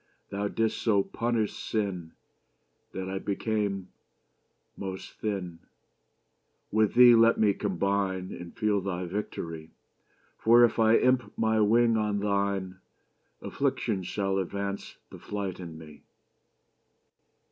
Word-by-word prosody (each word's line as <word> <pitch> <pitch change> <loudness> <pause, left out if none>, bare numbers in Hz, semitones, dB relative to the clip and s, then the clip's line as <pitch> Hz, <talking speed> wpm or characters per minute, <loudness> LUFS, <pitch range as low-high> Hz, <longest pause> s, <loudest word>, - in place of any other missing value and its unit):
Thou 100 +1 -1
didst 110 +1 -1
so 100 -4 +3
punish 115 -1 -1
sinne, 95 -7 -3 0.8
That 95 0 -5
I 95 0 -3
became 100 -2 -2 0.9
Most 95 -1 -6
thinne. 95 -6 -3 1.1
With 110 -1 +2
thee 125 0 +9
Let 115 0 +5
me 105 -2 +4
combine, 95 -1 -1
And 85 -1 -9
feel 105 -3 +1
thy 90 -1 -3
victorie: 85 -4 -5 0.7
For, 120 +2 +6
if 115 - -2
I 110 0 +5
imp 125 -4 +2
my 110 0 +2
wing 115 +2 +4
on 105 -1 0
thine, 100 -2 -1 0.6
Affliction 95 - -1
shall 95 +1 -1
advance 100 +1 -4
the - - -10
flight 100 -3 -5
in 85 -3 -8
me. 75 -2 -13
100 Hz, 115 wpm, -28 LUFS, 95-110 Hz, 1.1 s, thee